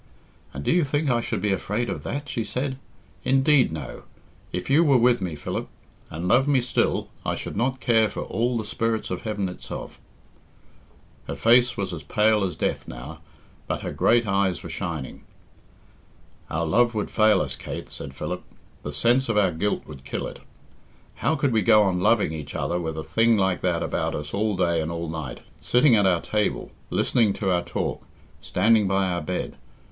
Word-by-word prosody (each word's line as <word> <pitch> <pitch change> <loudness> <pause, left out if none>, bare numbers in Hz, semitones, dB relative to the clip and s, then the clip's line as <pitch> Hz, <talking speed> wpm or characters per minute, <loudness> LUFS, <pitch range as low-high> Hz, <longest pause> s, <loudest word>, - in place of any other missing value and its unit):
"And 70 - -6
do - - +1
you 175 -1 +4
think 145 0 0
I 120 -1 +2
should - - -3
be 105 - +2
afraid 105 +5 -1
of - - -4
that?" 145 +1 -4
she 115 - -2
said. 130 +3 -3 0.4
"Indeed, 135 - +4
no. 75 -6 -6 0.5
If 90 - -4
you 145 +5 +5
were 140 -5 +5
with 120 -1 +3
me, 90 -4 -3
Philip, 75 - -4 0.4
and 85 +3 -4
loved 125 +8 +4
me 140 -2 +4
still, 125 0 0
I - - -1
should - - -6
not 130 +5 0
care 115 -4 +3
for - - -5
all 120 +1 -1
the 110 - -3
spirits 110 +1 -2
of - - -3
heaven 105 -3 -2
itself." 90 - -8 1.3
Her 70 - -4
face 120 - +4
was - - -2
as - - -5
pale 105 -1 +2
as 90 -4 -2
death - - -2
now, 70 +7 -8 0.5
but - - -2
her - - -4
great 120 0 +3
eyes 95 -2 0
were 85 - -7
shining. 80 -7 -5 1.3
"Our 85 +2 -1
love 120 +8 +3
would 105 - -2
fail 110 -3 +4
us, - - -2
Kate," - - -7
said 70 -1 -7
Philip. - - -4 0.4
"The 75 - -5
sense 120 - +2
of 110 - +1
our 95 -3 +4
guilt 100 +6 -1
would 70 -3 -11
kill - - -4
it. - - -8 0.8
How 160 - +1
could 140 -4 +1
we 110 - +3
go 110 +1 +6
on 95 -3 +1
loving 105 -3 +3
each 75 -3 -7
other 85 - -1
with 80 -2 -4
a 80 - -3
thing 115 +9 +3
like 95 -2 +1
that 85 -2 0
about - - -1
us 75 0 -6
all 105 0 0
day 85 -1 +2
and 80 +1 -3
all 85 -1 -4
night 80 -5 -6 0.2
sitting 125 0 +4
at 100 -2 +4
our 90 -2 +2
table 105 -1 -1 0.2
listening 110 -5 +2
to 95 -2 -1
our 90 -1 +2
talk - - -3 0.4
standing 110 -2 +3
by 95 0 +2
our 90 -1 -1
bed? 90 +4 -4
105 Hz, 195 wpm, -25 LUFS, 85-120 Hz, 1.3 s, go